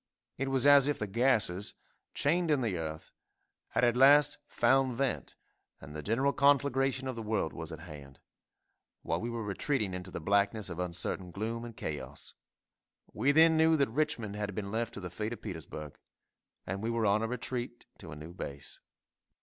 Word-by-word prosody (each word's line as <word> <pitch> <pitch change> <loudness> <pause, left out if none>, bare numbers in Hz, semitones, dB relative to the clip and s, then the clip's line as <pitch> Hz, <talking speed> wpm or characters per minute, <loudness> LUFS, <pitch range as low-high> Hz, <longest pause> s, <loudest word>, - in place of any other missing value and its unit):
It 135 - -1
was 135 0 +2
as 145 -1 +7
if 145 - 0
the 105 - -2
gases, 105 -4 +1 0.4
chained 165 +4 +2
in 145 -3 +3
the 110 -6 -1
earth, 80 -1 -5 0.6
had - - -1
at 120 -1 +4
last 145 +3 +6
found 130 -2 +2
vent, 135 -2 -2 0.4
and 70 +2 -11
the 75 - -4
general 130 - +1
conflagration 135 -1 +2
of 130 - -3
the 115 - -5
world 110 -7 -1
was 80 0 -6
at 80 0 -8
hand, 70 -5 -11 0.8
while - - -1
we 115 - -3
were 115 -1 -4
retreating 105 +1 -1
into 90 +1 -6
the 90 - -6
blackness 100 +3 +1
of 85 - -6
uncertain 90 +1 -2
gloom 110 +5 -4
and 115 -2 -9
chaos. 70 -2 -6 0.8
We 130 +7 +2
then 160 +2 +6
knew 160 0 +5
that 140 -4 +2
Richmond 120 -6 -1
had 105 -2 -4
been 100 -1 -4
left 115 +1 -2
to - - -5
the 90 -3 -7
fate 105 +5 -3
of - - -10
Petersburg, 80 -6 -7 0.7
and 95 +2 -4
we 115 - -2
were 115 -1 0
on 100 +1 +3
a 115 - 0
retreat 125 0 -5
to - - -10
a - - -7
new 75 +3 -9
base. 70 -6 -8
110 Hz, 185 wpm, -31 LUFS, 90-135 Hz, 0.8 s, as